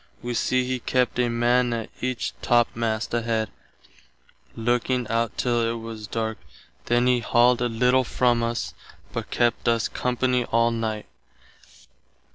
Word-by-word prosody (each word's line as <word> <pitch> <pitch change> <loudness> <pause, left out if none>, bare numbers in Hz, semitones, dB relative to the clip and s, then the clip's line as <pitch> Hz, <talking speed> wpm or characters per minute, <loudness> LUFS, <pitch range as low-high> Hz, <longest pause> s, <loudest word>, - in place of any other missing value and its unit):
Wee 120 0 -3
see 130 +2 +1
he 130 0 -2
kept 125 +1 0
a 120 -1 +2
man 120 +1 +2
at 115 -2 -4
each 130 -1 -2
topmast 115 -2 +1
head, 115 -2 -1 1.0
looking 120 +1 0
out 115 0 0
till 120 -1 +1
it 115 0 -1
was 110 -2 -7
darke, 110 0 -3 0.5
then 120 +1 +2
he 125 -1 +3
halled 120 +1 +3
a 120 - +1
little 125 +3 +3
from 120 -1 +1
us, 115 0 -2 0.4
but - - -4
kept 120 -1 +1
us 115 -1 +2
company 125 0 0
all 115 +1 +2
night. 110 -2 -3
120 Hz, 140 wpm, -24 LUFS, 115-125 Hz, 1.0 s, he